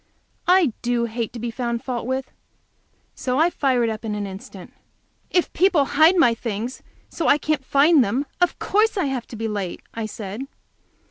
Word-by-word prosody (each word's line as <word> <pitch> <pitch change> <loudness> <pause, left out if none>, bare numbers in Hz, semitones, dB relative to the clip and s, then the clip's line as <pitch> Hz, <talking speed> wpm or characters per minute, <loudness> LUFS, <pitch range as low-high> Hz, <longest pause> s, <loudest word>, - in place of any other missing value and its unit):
I 355 - +4
do 240 -1 0
hate 230 -1 -3
to 240 - -7
be 235 +1 -3
found 235 0 -3
fault 245 -3 -3
with, 260 0 -2 0.8
so 255 0 -2
I 330 +4 +4
fired 255 -7 +1
up 220 0 -4
in 215 -2 -3
an 205 -1 -3
instant. 190 -1 -10 0.6
"If 355 - +1
people 350 -5 +3
hide 315 +6 +5
my 245 -9 +5
things 230 +1 -4 0.3
so 335 - -4
that - - +4
I 285 - +6
can't 300 -2 -1
find 280 +2 +5
them, 240 +7 -1 0.2
of 355 - +2
course 430 +2 +1
I 370 - +1
have 265 -4 -3
to - - -9
be 225 0 -3
late," 200 -4 -4
I 225 -1 -3
said. 215 +5 -6
250 Hz, 190 wpm, -22 LUFS, 225-295 Hz, 0.8 s, I